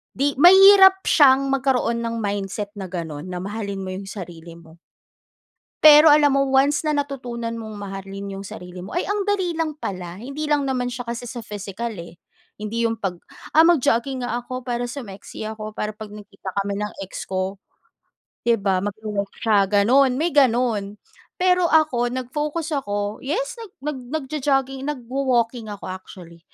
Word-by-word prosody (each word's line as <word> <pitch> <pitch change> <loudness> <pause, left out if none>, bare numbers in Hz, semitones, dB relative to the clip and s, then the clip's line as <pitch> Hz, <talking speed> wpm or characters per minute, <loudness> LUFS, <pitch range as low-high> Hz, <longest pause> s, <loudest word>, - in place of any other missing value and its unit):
'Di 280 +2 +1
mahirap 385 +2 +8
siyang 275 -2 +5
magkaroon 260 -3 +1
ng 230 0 -3
mindset 205 0 -3
na 190 - -5
gano'n, 165 -3 -6
na 180 -1 -5
mahalin 200 -1 -4
mo 185 - -5
'yong 195 +1 -7
sarili 170 -4 -9
mo. 165 0 -17 1.1
Pero 305 0 +9
alam 290 -2 +6
mo, 275 0 +2
once 270 +3 +2
na 305 - +1
natutunan 245 -5 -4
mong 220 -1 -8
mahalin 195 0 -7
'yong 195 - -8
sarili 180 0 -9
mo, 185 - -8
ay 350 - +1
ang 410 0 -1
dali 385 -4 +1
lang 320 -2 -1
pala. 180 - -6
Hindi 280 +6 -5
lang 295 -1 +2
naman 255 -2 -1
siya 245 0 -5
kasi 235 +1 -5
sa 235 0 -7
physical, 210 +2 -5
eh. 170 0 -10 0.4
Hindi 230 +2 -2
'yong 225 - -2
'pag, 180 -3 -3 0.3
"Ah, 320 +1 +6
mag-jogging 265 -5 +2
nga 240 0 -2
ako 255 +1 -7
para 245 -1 -2
sumexy 225 -6 -8
ako, 215 0 -6
para 210 - -2
'pag 215 -1 -10
nagkita 200 -2 -9
kami 200 0 -3
ng 210 0 -4
ex 190 - -8
ko." 190 +1 -3 0.9
'Di 235 - +5
ba, 195 -2 +1
magwo-walk 205 -1 -4
siya, 205 -3 +3
gano'n, 235 +7 +4
may 335 +2 +1
gano'n. 235 -7 +2 0.4
Pero 360 -1 +3
ako, 310 -7 +3
nag-focus 295 +6 -3
ako, 205 -7 -2
yes, 415 - -3
nag 445 -4 -9
nag 300 -1 -3 0.2
nagjo-jogging, 270 -2 -1
nagwo-walking 250 -3 -1
ako, 205 -2 -7
actually. 180 -2 -11
235 Hz, 165 wpm, -22 LUFS, 200-280 Hz, 1.1 s, Pero